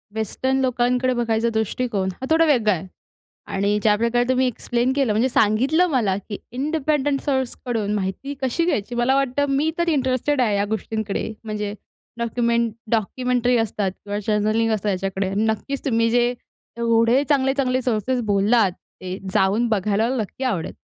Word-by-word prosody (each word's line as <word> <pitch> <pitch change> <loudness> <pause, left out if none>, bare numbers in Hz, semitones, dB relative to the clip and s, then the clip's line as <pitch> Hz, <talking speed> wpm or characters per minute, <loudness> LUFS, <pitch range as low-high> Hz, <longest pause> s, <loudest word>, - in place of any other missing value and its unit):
Western 260 +5 -1
लोकांकडे 250 0 +1
बघायचा 230 -1 0
दृष्टिकोन 220 -2 -1
हा - - -2
थोडा 325 +1 +4
वेगळा 235 -9 +3
आहे. 185 +1 -5 0.6
आणि 200 +2 0
ज्याप्रकारे 230 +3 +2
तुम्ही 260 0 +3
एक्सप्लेन 240 +1 -1
केलं 270 -6 +2
म्हणजे 230 +5 +2
सांगितलं 260 +11 +3
मला 220 -9 +1
की 205 +1 -7
इंडिपेंडेंट 290 +1 0
सोर्सकडून 245 -6 -2
माहिती 200 +8 -3
कशी 265 +6 0
घ्यायची 240 - -1
मला 240 +3 +2
वाटतं, 275 +1 +1
मी 280 +3 +1
तर 340 0 0
इंटरेस्टेड 265 -1 +1
आहे 215 -4 +2
या 200 - +1
गोष्टींकडे, 220 0 -3 0.2
म्हणजे 210 -1 -3 0.4
डॉक्युमेंट, 235 0 0 0.2
डॉक्युमेंटरी 245 +2 +1
असतात 210 -3 -1
किंवा 205 +2 -6
जर्नलिंग 215 +1 +1
असतं 210 -1 -1
याच्याकडे, 195 0 -2
नक्कीच 220 +6 -1
तुम्ही 230 -3 +2
जे 240 +1 +3 0.5
एवढे 230 +3 +3
चांगले, 270 -2 +3
चांगले 255 -2 0
सोर्सेस 245 +1 0
बोललात 200 +1 +3
ते 185 +1 -9 0.2
जाऊन 205 +5 +2
बघायला 215 +1 +1
मला 260 - -1
नक्की 220 +5 -6
आवडेल. 195 -11 -2
235 Hz, 150 wpm, -22 LUFS, 210-260 Hz, 0.6 s, थोडा